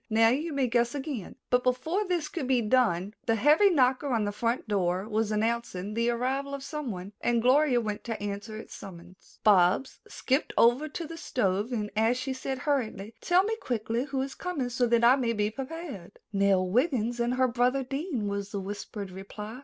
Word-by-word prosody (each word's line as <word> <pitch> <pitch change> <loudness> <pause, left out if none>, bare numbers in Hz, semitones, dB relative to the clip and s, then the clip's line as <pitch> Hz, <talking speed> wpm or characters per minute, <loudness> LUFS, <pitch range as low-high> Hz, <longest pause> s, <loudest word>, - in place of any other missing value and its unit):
"Now 225 +1 +5
you 300 +7 -1
may 280 -3 +1
guess 240 +1 +1
again." 270 - -5 0.2
But 250 0 +4
before 320 +11 0
this 345 -4 0
could 300 -4 -4
be 255 -3 +2
done, 210 -5 +2
the 225 - +3
heavy 300 - +5
knocker 265 -4 +2
on 230 -5 +1
the 205 - -1
front 230 +3 -1
door 190 -1 0
was 220 0 0
announcing 215 -3 -1
the 230 +2 +1
arrival 265 +4 -1
of 275 - -8
someone, 225 - -5
and 240 -1 +2
Gloria 255 +2 +4
went 215 -2 -4
to 225 -2 -3
answer 205 +2 -5
its 220 - -10
summons. 180 -1 -12
Bobs 195 +4 +4
skipped 265 +3 -1
over 250 +7 +4
to 335 +3 -5
the 330 +1 -8
stove 205 - -1 0.2
as 225 +3 +2
she 260 +1 -3
said 265 0 -4
hurriedly, 230 -7 -1
"Tell 360 +1 +4
me 440 +2 -1
quickly 235 - -2
who 270 -2 -2
is 270 - -6
coming, 315 -9 -3
so 245 0 +1
that 235 0 +3
I 245 +3 +7
may 235 -3 0
be 210 -1 0
prepared." 270 - -7 0.2
"Nell 195 -2 +3
Wiggin 240 - +1
and 240 +1 +1
her 255 0 +3
brother 250 +2 +1
Dean," 270 - -3
was 200 0 -3
the 200 - -3
whispered 200 0 -6
reply. 210 +5 -8
240 Hz, 195 wpm, -28 LUFS, 210-270 Hz, 0.2 s, I